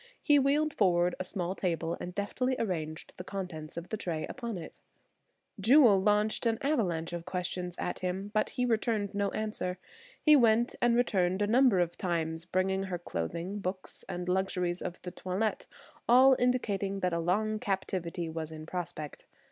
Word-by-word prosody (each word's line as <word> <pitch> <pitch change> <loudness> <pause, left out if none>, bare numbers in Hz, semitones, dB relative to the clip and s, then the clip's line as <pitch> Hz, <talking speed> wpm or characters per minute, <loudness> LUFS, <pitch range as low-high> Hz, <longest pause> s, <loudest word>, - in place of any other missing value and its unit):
He 290 -1 +4
wheeled 290 +3 +2
forward 180 -3 +3
a - - -1
small 185 -1 -3
table 170 -3 -1
and 180 0 -6
deftly 250 +6 -1
arranged 160 -7 -3
the 180 - -6
contents 180 -6 -6
of 170 +1 -6
the 220 - -2
tray 165 -5 -3
upon 235 -5 -5
it. 165 -3 -9 0.8
Jewel 225 -2 +6
launched 210 +3 +2
an 225 -1 +1
avalanche 175 - 0
of 170 -1 -4
questions 180 -1 -3
at - - -3
him, 190 +3 -3
but 215 - +1
he 250 -1 -1
returned 220 -3 0
no 200 0 0
answer. 210 -4 -3 0.4
He 305 -1 +6
went 235 -2 +4
and 240 -1 +4
returned 190 -5 +2
a - - +3
number 235 -2 +4
of 175 -1 -1
times, 165 -2 -2
bringing 190 +2 0
her 185 -2 -3
clothing, 170 - -4
books 185 -1 -5
and 180 0 -4
luxuries 180 -1 0
of 180 0 -5
the 180 - -5
toilet, 190 +4 -2 0.4
all 260 +2 +7
indicating 205 -6 0
that 180 -1 +1
a 170 - 0
long 215 +6 0
captivity 185 -4 -2
was 160 -1 -5
in 155 0 -8
prospect. 170 -4 -6
190 Hz, 170 wpm, -30 LUFS, 175-220 Hz, 0.8 s, all